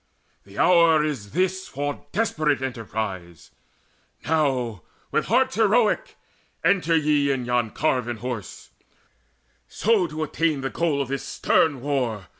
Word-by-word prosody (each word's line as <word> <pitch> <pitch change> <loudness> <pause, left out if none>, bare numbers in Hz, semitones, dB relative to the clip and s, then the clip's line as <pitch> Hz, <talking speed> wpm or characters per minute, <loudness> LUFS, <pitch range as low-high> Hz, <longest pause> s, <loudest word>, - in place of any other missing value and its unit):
The 100 0 -14
hour 170 -3 +5
Is 135 -10 -3
this 190 +2 0
for 145 +1 -5
desperate 155 -9 0
emprise: 105 - -5 0.7
now, 130 - 0 0.3
with - - +1
hearts 260 +2 +2
Heroic, 225 - +2 0.5
enter 170 -4 +3
ye 150 -2 +2
yon 120 -3 0
carven 125 -3 -1
horse, 120 -3 -7 1.0
So 210 -4 +1
to 155 0 -4
attain 155 -1 0
the 135 - -3
goal 155 -5 0
of 130 - -10
this 140 -1 -3
stern 145 -6 +1
war. 125 -8 -2
145 Hz, 120 wpm, -24 LUFS, 120-170 Hz, 1.0 s, hour